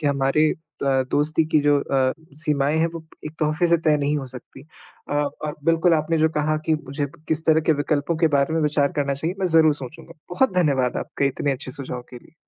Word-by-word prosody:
कि 150 - -1
हमारे 140 +2 +2 0.4
अ, 135 -1 +2
दोस्ती 155 +2 +1
की 155 - +5
जो 145 0 +3
अ, 130 -2 +1 0.3
सीमाएँ 145 0 +1
हैं, 165 - +3
वो 165 -1 -8 0.2
एक 155 - -7
तोहफ़े 155 +3 +1
से 170 - +5
तय 155 -1 +4
नहीं 145 +1 0
हो 140 -2 -4
सकती। 130 +1 -11 0.5
अ, - - -4
और 150 +1 -2
बिल्कुल 165 +1 +3
आपने 160 +1 0
जो 160 +1 +4
कहा 155 +1 +1
कि 160 - +3
मुझे 145 -1 -3 0.2
किस 160 0 0
तरह 160 0 +5
के 160 - +7
विकल्पों 150 +2 -1
के 160 0 +3
बारे 140 +3 +1
में 165 - +1
विचार 145 -1 +1
करना 140 -1 0
चाहिए, 160 +6 -3
मैं 185 - +1
ज़रूर 160 -3 +4
सोचूँगा। 140 +4 -10 0.2
बहुत 260 +4 +2
धन्यवाद 140 -8 +1
आपके 140 - -2
इतने 140 +1 -1
अच्छे 130 0 -6
सुझाव 130 -2 -6
के 125 - -10
लिए। 155 - -23
150 Hz, 220 wpm, -23 LUFS, 140-160 Hz, 0.5 s, के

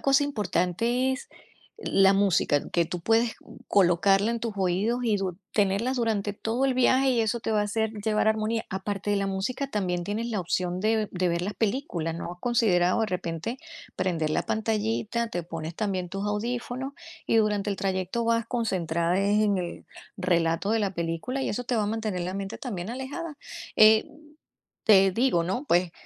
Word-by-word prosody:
cosa 275 +1 +4
importante 230 - 0
es 260 - -6 0.5
la 195 - +4
música, 195 -7 +2
que 170 - +2
tú 175 +2 -5
puedes 225 +5 +2 0.3
colocarla 195 +3 +3
en 235 - -1
tus 230 -1 -3
oídos 195 +6 0
y 225 -4 +2
du 190 -3 -3 0.2
tenerla 205 +5 +1
durante 220 -4 0
todo 225 +5 -1
el 265 -1 +2
viaje 260 +1 +4
y 240 -2 +2
eso 225 +2 -1
te 225 - -3
va 215 -1 +2
a - - +1
hacer 220 +1 -1
llevar 220 0 +2
armonía. 220 +1 0
Aparte 195 +1 -3
de 205 - +2
la 195 0 0
música, 195 +8 -2
también 180 -7 -1
tienes 220 +5 -2
la 220 - -2
opción 180 +1 -1
de 215 0 +1
de 180 -1 0
ver 170 +1 0
la 205 +3 -3
película, 200 - -1
¿no 170 +1 -5
has - - -25
considerado, 205 -6 +2
de 220 - +2
repente, 180 +5 -3 0.4
prender 165 -4 0
la - - +1
pantallita?, 220 +1 -1
te 175 -5 -3
pones 165 -1 -6
también 190 -3 -2
tus 195 +3 -4
audífonos 245 +5 -3 0.3
y - - +2
durante 210 -2 +1
el 200 - -2
trayecto 190 +4 -1
vas 230 0 +1
concentrada 175 -7 0
en 205 0 +2
el 175 -1 -6 0.3
relato 175 +1 +1
de 225 - +2
la 200 -3 -1
película 170 +11 -2
y - - -1
eso 245 +4 -3
te 245 - -1
va 220 - +2
a - - -2
mantener 215 -4 -2
la 180 +2 -3
mente 195 +1 -5
también 200 -6 -5
alejada, 285 +5 -5 0.4
eh, 220 0 +7 0.8
te 195 -3 +6
digo, 225 -5 +2
¿no?, 195 - -2
pues, 175 -3 +2
205 Hz, 185 wpm, -27 LUFS, 180-230 Hz, 0.8 s, eh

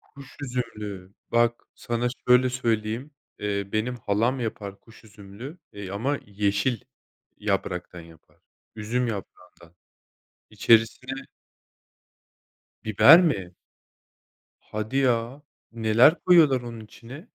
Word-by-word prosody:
Kuş 140 -2 -15
üzümlü. 105 -7 -5 0.2
Bak, 120 0 +2
sana 120 +1 -2 0.2
şöyle 125 +1 +5
söyleyeyim. 115 +2 -2 0.3
Eee, 100 -1 -2
benim 120 +3 -1
halam 115 +4 0
yapar 100 -3 -5
kuş 115 0 -19
üzümlü, 105 - -11
eee, 100 -2 -8
ama 130 +9 -1
yeşil 100 +3 0 0.6
yapraktan 95 -3 -3
yapar, 80 -1 -18 0.4
üzüm 120 +4 -1
yaprağından. 90 -5 -9 0.7
İçerisine 115 +3 +2 1.7
Biber 135 - +8
mi? 95 - -1 1.1
Hadi 110 +5 -5
ya. 125 +1 0 0.3
Neler 115 +6 +5
koyuyorlar 155 -8 +5
onun 120 -2 -8
içine? 125 - -12
115 Hz, 95 wpm, -25 LUFS, 100-125 Hz, 1.7 s, Biber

